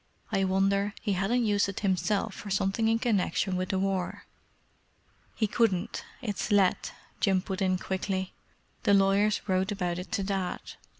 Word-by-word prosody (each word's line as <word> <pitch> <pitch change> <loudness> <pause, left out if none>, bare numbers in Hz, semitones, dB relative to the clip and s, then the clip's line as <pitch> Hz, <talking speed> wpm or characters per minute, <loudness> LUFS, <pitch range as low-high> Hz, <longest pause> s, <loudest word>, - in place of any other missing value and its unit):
"I 195 0 +2
wonder 195 +2 +1
he 205 - -1
hadn't 225 +6 +1
used 205 -1 +2
it 195 - -5
himself 200 +2 0
for 205 - -8
something 195 +3 +1
in 225 0 +3
connexion 205 -4 0
with 185 0 -2
the 190 - 0
War." 190 -1 -2 1.1
"He 220 - +1
couldn't—it's 215 0 -1
let," 200 -3 +3 0.3
Jim 195 -3 +3
put 190 +1 -5
in 185 -1 +2
quickly. 190 0 -3 0.5
"The 205 -4 +4
lawyers 195 +1 +3
wrote 190 +1 +1
about 180 -3 -2
it 180 - -8
to 195 - 0
Dad. 190 -2 -2
195 Hz, 155 wpm, -29 LUFS, 190-210 Hz, 1.1 s, The